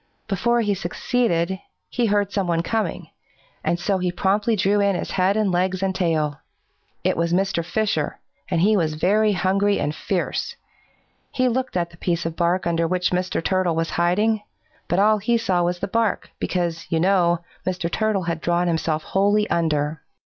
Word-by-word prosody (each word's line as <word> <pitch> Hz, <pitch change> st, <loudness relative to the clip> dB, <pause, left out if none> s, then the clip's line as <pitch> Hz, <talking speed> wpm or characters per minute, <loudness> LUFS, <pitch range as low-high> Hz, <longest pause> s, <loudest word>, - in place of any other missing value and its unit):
Before 235 Hz, +4 st, +1 dB
he 205 Hz, -2 st, +1 dB
succeeded, 190 Hz, -1 st, 0 dB, 0.3 s
he 240 Hz, -2 st, 0 dB
heard 205 Hz, -1 st, +1 dB
someone 175 Hz, -5 st, 0 dB
coming, 220 Hz, +4 st, -2 dB, 0.7 s
so 190 Hz, +3 st, -1 dB
he 180 Hz, -1 st, 0 dB
promptly 205 Hz, +5 st, +1 dB
drew 200 Hz, +1 st, +2 dB
in 200 Hz, -1 st, +2 dB
his -, -, -4 dB
head 190 Hz, +2 st, +2 dB
and 210 Hz, -3 st, +2 dB
legs 185 Hz, +1 st, 0 dB
and 190 Hz, -1 st, +1 dB
tail. 155 Hz, -6 st, 0 dB, 0.6 s
It -, -, +2 dB
was 170 Hz, 0 st, 0 dB
Mr. 185 Hz, -1 st, +1 dB
Fisher, 175 Hz, -4 st, -1 dB, 0.3 s
and 170 Hz, -3 st, +1 dB
he 210 Hz, +4 st, +4 dB
was 160 Hz, -5 st, 0 dB
very 210 Hz, +6 st, +3 dB
hungry 195 Hz, +2 st, +1 dB
and 145 Hz, -, -1 dB
fierce. 185 Hz, +3 st, -2 dB, 0.8 s
He 255 Hz, -1 st, +1 dB
looked 255 Hz, -4 st, -1 dB
at 170 Hz, -1 st, -1 dB
the 165 Hz, -, -16 dB
piece 170 Hz, -2 st, -1 dB
of 165 Hz, -1 st, -3 dB
bark 175 Hz, +2 st, +1 dB
under 165 Hz, -1 st, +1 dB
which 180 Hz, +1 st, 0 dB
Mr. 180 Hz, -2 st, -1 dB
Turtle 185 Hz, -2 st, +1 dB
was 165 Hz, 0 st, -1 dB
hiding, 205 Hz, +6 st, +2 dB, 0.5 s
but 175 Hz, -, 0 dB
all 210 Hz, +2 st, +4 dB
he 235 Hz, +4 st, +2 dB
saw 190 Hz, -6 st, +1 dB
was 175 Hz, +1 st, 0 dB
the 200 Hz, -, -3 dB
bark, 225 Hz, +1 st, 0 dB
because, 170 Hz, -2 st, -2 dB
you 165 Hz, -, +1 dB
know, 175 Hz, -1 st, +3 dB, 0.3 s
Mr. 180 Hz, -2 st, -1 dB
Turtle 215 Hz, +1 st, 0 dB
had 170 Hz, -2 st, -3 dB
drawn 175 Hz, +1 st, +1 dB
himself 160 Hz, -2 st, 0 dB
wholly 205 Hz, +2 st, +2 dB
under. 155 Hz, -2 st, 0 dB
185 Hz, 175 wpm, -23 LUFS, 170-205 Hz, 0.8 s, he